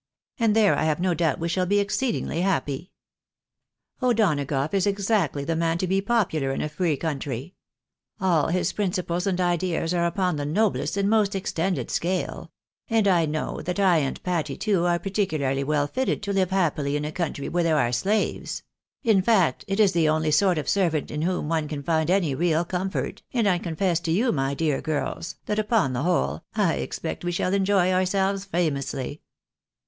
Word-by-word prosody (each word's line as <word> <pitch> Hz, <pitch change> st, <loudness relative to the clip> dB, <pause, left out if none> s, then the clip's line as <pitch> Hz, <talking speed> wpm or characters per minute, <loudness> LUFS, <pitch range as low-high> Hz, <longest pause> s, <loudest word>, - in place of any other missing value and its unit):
Ap^d 225 Hz, -2 st, +3 dB
there 215 Hz, -3 st, +5 dB
I -, -, 0 dB
have 155 Hz, 0 st, +1 dB
no 180 Hz, 0 st, +1 dB
doubt 165 Hz, -1 st, +1 dB
we 165 Hz, -, -1 dB
shall 180 Hz, +1 st, 0 dB
be 205 Hz, +2 st, +2 dB
exceedingly 205 Hz, -3 st, -1 dB
happy. 180 Hz, -3 st, -1 dB, 1.1 s
O'Do 240 Hz, -3 st, +3 dB
HC 145 Hz, -2 st, -3 dB
rough 140 Hz, +3 st, -1 dB
is 195 Hz, 0 st, +2 dB
exactly 200 Hz, -7 st, 0 dB
the 165 Hz, +3 st, -1 dB
man 165 Hz, 0 st, +1 dB
to 185 Hz, -, -1 dB
be 190 Hz, +2 st, +1 dB
popular 195 Hz, -, 0 dB
in 135 Hz, -, -2 dB
a 150 Hz, -, -2 dB
free 150 Hz, -1 st, 0 dB
country. 145 Hz, 0 st, -4 dB, 0.7 s
All 170 Hz, -5 st, +2 dB
MiS 180 Hz, 0 st, 0 dB
principles 180 Hz, -2 st, -1 dB
and 185 Hz, -2 st, 0 dB
ideas 175 Hz, -1 st, 0 dB
are 170 Hz, -1 st, +2 dB
upon 180 Hz, -1 st, 0 dB
the 145 Hz, -, -2 dB
noblest 155 Hz, -3 st, 0 dB
and 200 Hz, 0 st, +1 dB
most 210 Hz, -2 st, +2 dB
extended 185 Hz, -1 st, -2 dB
scale; 180 Hz, +1 st, -2 dB, 0.4 s
and 225 Hz, -3 st, +3 dB
I 170 Hz, -4 st, +3 dB
know 155 Hz, +1 st, -3 dB
that 180 Hz, +4 st, -3 dB
I 185 Hz, -4 st, +4 dB
and 140 Hz, -3 st, -2 dB
Patty, 160 Hz, -6 st, -2 dB
too, 190 Hz, -5 st, +1 dB
are 175 Hz, 0 st, +2 dB
particularly 155 Hz, -8 st, -1 dB
well 145 Hz, 0 st, +1 dB
fitted 255 Hz, -, -2 dB
to 200 Hz, 0 st, -2 dB
live 190 Hz, -2 st, +2 dB
happily 155 Hz, -7 st, 0 dB
in 150 Hz, 0 st, -1 dB
a 150 Hz, -, -3 dB
country 155 Hz, -4 st, -3 dB
where 175 Hz, 0 st, 0 dB
there 160 Hz, -2 st, +2 dB
are 120 Hz, -5 st, +2 dB
slaves; 200 Hz, -, -1 dB, 0.4 s
in 220 Hz, -6 st, +4 dB
fact 185 Hz, -, +2 dB
it 195 Hz, +1 st, -2 dB
is 205 Hz, -3 st, +5 dB
the 165 Hz, -3 st, +2 dB
only 155 Hz, 0 st, +1 dB
sort 185 Hz, +1 st, +3 dB
of 150 Hz, -, -3 dB
servant 170 Hz, -7 st, +1 dB
in 150 Hz, -, -3 dB
whom 180 Hz, -2 st, -1 dB
one 160 Hz, -1 st, 0 dB
can 145 Hz, -2 st, -5 dB
find 160 Hz, +1 st, +1 dB
any 180 Hz, -6 st, +2 dB
real 165 Hz, +3 st, +1 dB
comfort, 185 Hz, +2 st, -3 dB
and 230 Hz, -4 st, +2 dB
I 180 Hz, -3 st, +2 dB
confess 170 Hz, 0 st, 0 dB
to 170 Hz, -2 st, -3 dB
you, 230 Hz, +8 st, +2 dB
my 135 Hz, -1 st, -1 dB
dear 150 Hz, -2 st, 0 dB
girls, 155 Hz, +3 st, -3 dB
that 210 Hz, 0 st, -1 dB
upon 210 Hz, -, +1 dB
the 125 Hz, -, -1 dB
whole, 75 Hz, -, 0 dB
I -, -, +2 dB
expect -, -, -4 dB
we 175 Hz, -, -1 dB
shall 180 Hz, +2 st, -1 dB
enjoy 195 Hz, -2 st, +3 dB
ourselves 190 Hz, +1 st, +1 dB
famously." 145 Hz, -6 st, -2 dB
175 Hz, 195 wpm, -25 LUFS, 155-195 Hz, 1.1 s, there